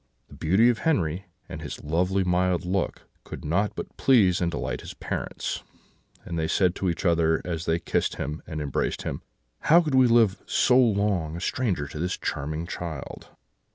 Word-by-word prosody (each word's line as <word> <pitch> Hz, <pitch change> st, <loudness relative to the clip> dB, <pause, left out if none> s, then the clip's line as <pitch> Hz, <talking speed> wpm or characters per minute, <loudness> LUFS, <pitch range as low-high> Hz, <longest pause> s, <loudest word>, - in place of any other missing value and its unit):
The -, -, -14 dB
beauty 95 Hz, +9 st, +3 dB
of 120 Hz, -, +1 dB
Henri, 95 Hz, -, 0 dB, 0.2 s
and 80 Hz, -4 st, -7 dB
his 75 Hz, -, -7 dB
lovely 90 Hz, +5 st, +1 dB
mild 90 Hz, 0 st, +1 dB
look, 95 Hz, +1 st, -1 dB, 0.2 s
could -, -, -9 dB
not 100 Hz, +7 st, 0 dB
but -, -, -7 dB
please 100 Hz, -10 st, +4 dB
and 85 Hz, -, +2 dB
delight 65 Hz, -5 st, -3 dB
his -, -, -9 dB
parents, -, -, -4 dB, 0.6 s
and 85 Hz, -, -3 dB
they 80 Hz, -, 0 dB
said 90 Hz, 0 st, +2 dB
to 95 Hz, -, 0 dB
each 85 Hz, +3 st, -3 dB
other, 80 Hz, -2 st, +3 dB
as 85 Hz, -2 st, -3 dB
they 80 Hz, -, +2 dB
kissed 85 Hz, -, -1 dB
him 75 Hz, +2 st, -4 dB
and 80 Hz, -2 st, -4 dB
embraced 70 Hz, -3 st, -2 dB
him: -, -, -4 dB, 0.4 s
"'How 165 Hz, +3 st, +6 dB
could 155 Hz, -5 st, -1 dB
we 130 Hz, -1 st, +6 dB
live 115 Hz, -4 st, +4 dB
so 125 Hz, -, +3 dB
long 100 Hz, -9 st, +2 dB
a -, -, -5 dB
stranger 95 Hz, -, -1 dB
to 75 Hz, -, -8 dB
this 90 Hz, +2 st, -1 dB
charming 75 Hz, +4 st, -3 dB
child?' 85 Hz, -5 st, -6 dB
90 Hz, 185 wpm, -26 LUFS, 80-100 Hz, 0.6 s, How